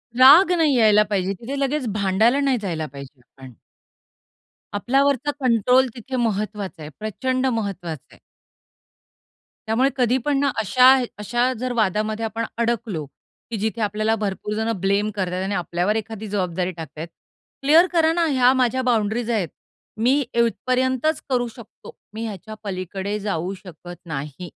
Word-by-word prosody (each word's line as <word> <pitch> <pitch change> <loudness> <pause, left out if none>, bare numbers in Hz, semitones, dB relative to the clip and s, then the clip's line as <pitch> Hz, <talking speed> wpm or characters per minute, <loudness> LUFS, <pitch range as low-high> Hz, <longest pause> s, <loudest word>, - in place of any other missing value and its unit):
राग 295 +9 +8
नाही 305 -5 +3
यायला 210 -2 +5
पाहिजे. 195 -1 0
तिथे 255 +4 -5
लगेच 275 0 -1
भांडायला 215 +6 +2
नाही 270 -3 +2
जायला 165 -5 -3
पाहिजे 140 -1 -11
आपण. 130 +1 -15 1.2
आपल्यावरचा 275 +5 +1
कंट्रोल 250 +1 +3
तिथे 255 +2 -6
महत्त्वाचा 210 -6 -2
आहे. 150 - -7
प्रचंड 255 +5 -2
महत्त्वाचा 195 - -3
आहे. - - -23 1.5
त्यामुळे 250 +5 +2
कधी 250 0 +2
पण 290 -2 +1
ना 280 0 +2
अशा 250 +4 +3 0.3
अशा 240 +4 0
जर 255 0 -2
वादामध्ये 215 +2 0
आपण 225 +1 -3
अडकलो, 230 -9 -1 0.5
की 225 - -2
जिथे 220 +2 -2
आपल्याला 215 +2 0
भरपूर 205 +1 -3
जणं 220 -2 -1
ब्लेम 200 +2 +1
करतायेत 185 -1 -2
आणि 200 0 -2
आपल्यावर 180 +4 -1
एखादी 220 -1 -5
जबाबदारी 185 -2 -2
टाकतायेत. 160 +1 -7 0.5
क्लिअर 320 +6 +6
करा 325 -1 +4
ना, 340 -1 +1
ह्या 255 -2 +4
माझ्या 255 0 +1
बाउंड्रीज 230 -1 0
आहेत. 200 -7 0 0.5
मी 255 +6 +3
इथपर्यंतच 255 +5 +1
करू 245 -2 +1
शकतो. 235 -4 -13 0.2
मी 225 +1 -4
ह्याच्या 215 +1 -7
पलीकडे 195 +1 -4
जाऊ 190 -2 -2
शकत 175 0 -10
नाही. 150 +2 -6
220 Hz, 140 wpm, -22 LUFS, 195-255 Hz, 1.5 s, राग